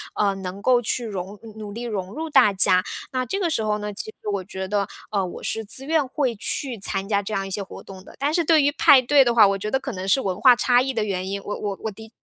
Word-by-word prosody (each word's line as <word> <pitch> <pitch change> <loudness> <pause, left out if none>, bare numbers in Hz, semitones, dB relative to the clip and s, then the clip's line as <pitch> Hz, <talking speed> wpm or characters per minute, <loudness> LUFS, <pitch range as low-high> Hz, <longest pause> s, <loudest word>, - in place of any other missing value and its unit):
呃， 200 -2 +2
能 190 0 -7
够 250 0 +4
去 240 +1 -2
融 200 -1 -6
努 220 -1 -11
努 - - -8
力 230 +4 -6
融 200 -5 -4
入 320 +1 -4
大 210 -9 +5
家， 185 -1 +4 0.3
那 255 -1 -1
这 255 - -3
个 360 -4 0
时 225 - 0
候 210 -1 0
呢， 210 0 -5
其 - - -4 0.2
实 - - -11
我 195 -2 -2
觉 190 0 -6
得， 200 0 0 0.2
呃， 200 -2 0
我 180 - -7
是 225 - -2
自 225 +6 -8
愿 310 -1 +1
会 255 -3 -1
去 240 +3 -4
参 195 0 -3
加 200 -1 +1
这 205 +2 -6
样 195 -1 -2
一 - - -9
些 200 - -2
活 195 - -9
动 190 -1 -11
的。 - - -15
但 285 +2 0
是 340 - +2
对 315 -2 +4
于 285 - +3
派 300 -3 +6
对 275 +2 +5
的 240 -2 +1
话， 215 -3 +7
我 195 0 0
觉 210 +2 -4
得 265 - +1
可 270 0 -5
能 190 -3 -6
是 240 - +4
文 190 -2 -3
化 255 -2 +7
差 245 0 +3
异 265 +1 -2
的 225 -3 0
原 190 -3 -3
因， 200 0 -3
我 205 - -4
我 200 -2 -3
我 220 - -2
的 220 +2 -13
215 Hz, 315 characters per minute, -23 LUFS, 195-255 Hz, 0.3 s, 话